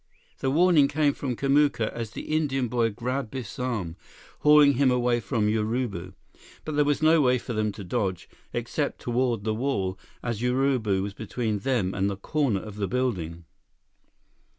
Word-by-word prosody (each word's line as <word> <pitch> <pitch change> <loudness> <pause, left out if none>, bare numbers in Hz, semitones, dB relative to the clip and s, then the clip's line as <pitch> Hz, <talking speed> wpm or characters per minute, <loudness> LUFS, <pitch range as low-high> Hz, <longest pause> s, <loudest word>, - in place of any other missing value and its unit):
The 135 - 0
warning 160 -1 +5
came 145 0 +2
from 130 -4 -3
Kamuka 140 -4 +2
as 115 -2 -4
the - - -7
Indian 135 -5 0
boy 115 0 +1
grabbed 125 +3 -3
Biff's 130 -4 -7
arm, 110 -10 -3 0.4
hauling 150 -1 +6
him 135 +1 +3
away 125 -1 +2
from 105 0 -1
Urubu. 105 -4 -2 0.5
But 155 - -3
there 150 - +4
was 145 +1 0
no 160 0 +5
way 125 -2 +3
for 120 - -6
them 110 -1 0
to 100 - -8
dodge, 95 0 -2 0.2
except - - -2
toward 120 -3 0
the 110 0 0
wall, 100 -6 -1 0.2
as 115 -3 -3
Urubu 125 -6 +1
was 100 0 -4
between 110 0 -3
them 115 -7 0
and 100 0 0
the 100 - -4
corner 120 -2 0
of 105 0 -9
the 100 -2 -1
building. 90 -10 -2
120 Hz, 170 wpm, -26 LUFS, 105-135 Hz, 0.5 s, hauling